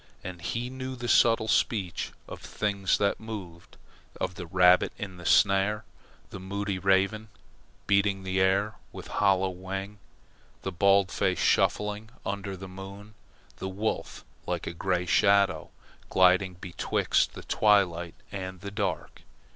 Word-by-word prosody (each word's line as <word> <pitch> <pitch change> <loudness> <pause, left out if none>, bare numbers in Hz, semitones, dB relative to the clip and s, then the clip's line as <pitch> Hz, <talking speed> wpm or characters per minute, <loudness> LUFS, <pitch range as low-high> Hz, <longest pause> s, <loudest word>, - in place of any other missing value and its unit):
And 90 -2 -7
he 120 +8 -3
knew 130 0 -5
the 120 -1 -5
subtle 115 -2 +4
speech 95 -7 0 0.2
of - - -9
the - - -10
things 100 -3 0
that 100 -1 +1
moved, 95 -7 -9 0.4
of 90 - -2
the 90 0 -8
rabbit 90 +1 +5
in 95 -4 -6
the 90 - -6
snare, 100 +2 +3 0.5
the - - -7
moody 100 +1 -3
raven 95 +3 +2 0.6
beating 100 -1 +2
the 95 0 -1
air 100 +3 +2 0.2
with - - -9 0.2
hollow 95 -1 +3
wing, 95 +3 -6 0.6
the 95 - -3
baldface 100 +1 +2
shuffling 105 +1 +1 0.2
under 100 -2 -4
the 95 +1 -8
moon, 95 +3 -10 0.4
the 95 - -4
wolf 105 +4 -3 0.2
like - - -2
a - - -4
grey 90 +1 -1
shadow 100 +2 +3 0.4
gliding 95 0 +4
betwixt 90 -1 0
the - - -9
twilight 90 -5 +2 0.2
and 95 -2 -6
the 100 0 -6
dark. 100 -3 -3
95 Hz, 140 wpm, -28 LUFS, 95-105 Hz, 0.6 s, rabbit